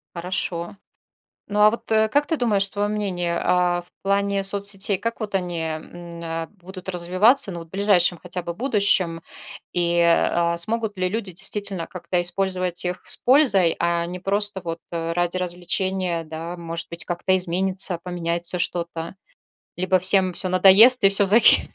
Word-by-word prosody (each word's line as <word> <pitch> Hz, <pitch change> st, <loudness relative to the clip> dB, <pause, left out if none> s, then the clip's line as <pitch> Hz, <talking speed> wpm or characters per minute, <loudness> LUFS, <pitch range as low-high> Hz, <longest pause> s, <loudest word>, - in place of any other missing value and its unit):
Хорошо. 175 Hz, 0 st, -4 dB, 0.7 s
Ну, 205 Hz, 0 st, -2 dB
а 210 Hz, 0 st, +7 dB
вот, 230 Hz, -, -7 dB
э, 220 Hz, 0 st, +3 dB
как 290 Hz, +5 st, +1 dB
ты 320 Hz, -1 st, -2 dB
думаешь, 205 Hz, -5 st, +2 dB
твоё 205 Hz, +1 st, -2 dB
мнение, 180 Hz, -5 st, -2 dB
а 180 Hz, -1 st, +1 dB
в 175 Hz, -, -21 dB
плане 200 Hz, 0 st, 0 dB
соцсетей, 200 Hz, 0 st, +1 dB
как 230 Hz, +4 st, -4 dB
вот 210 Hz, -2 st, -4 dB
они, 175 Hz, -3 st, -2 dB
м, 170 Hz, +2 st, -7 dB
э, 165 Hz, 0 st, -4 dB
будут 185 Hz, +1 st, -11 dB
развиваться, 185 Hz, +7 st, +3 dB
ну, 175 Hz, -, -6 dB
вот 165 Hz, -, -11 dB
в -, -, -32 dB
ближайшем 190 Hz, -3 st, +2 dB
хотя 180 Hz, +1 st, -6 dB
бы 170 Hz, -, -5 dB
будущем? 200 Hz, -7 st, 0 dB, 0.5 s
И, 175 Hz, -1 st, 0 dB
а, 170 Hz, 0 st, +2 dB
смогут 220 Hz, +3 st, -2 dB
ли 185 Hz, 0 st, 0 dB
люди 205 Hz, 0 st, -4 dB
действительно 195 Hz, 0 st, -4 dB
как-то 180 Hz, -1 st, -3 dB
использовать 180 Hz, 0 st, -1 dB
их 180 Hz, 0 st, -4 dB
с -, -, +4 dB
пользой, 245 Hz, -, +4 dB
а 170 Hz, 0 st, 0 dB
не 180 Hz, +1 st, -6 dB
просто, 200 Hz, +1 st, +1 dB
вот, 165 Hz, 0 st, -5 dB
ради 170 Hz, +1 st, -2 dB
развлечения, 180 Hz, -1 st, -2 dB
да, 160 Hz, +2 st, -7 dB
может 170 Hz, -1 st, -6 dB
быть, 170 Hz, 0 st, -5 dB
как-то 185 Hz, +2 st, 0 dB
изменится, 185 Hz, 0 st, 0 dB
поменяется 175 Hz, 0 st, -2 dB
что-то, 170 Hz, -1 st, -3 dB, 0.6 s
либо 185 Hz, +1 st, +1 dB
всем 185 Hz, 0 st, +3 dB
всё 185 Hz, -, -1 dB
надоест 200 Hz, +7 st, +6 dB
и 195 Hz, -, +7 dB
всё, 200 Hz, +1 st, +4 dB
за 205 Hz, +4 st, +5 dB
кхе -, -, +6 dB
185 Hz, 165 wpm, -22 LUFS, 170-200 Hz, 0.7 s, а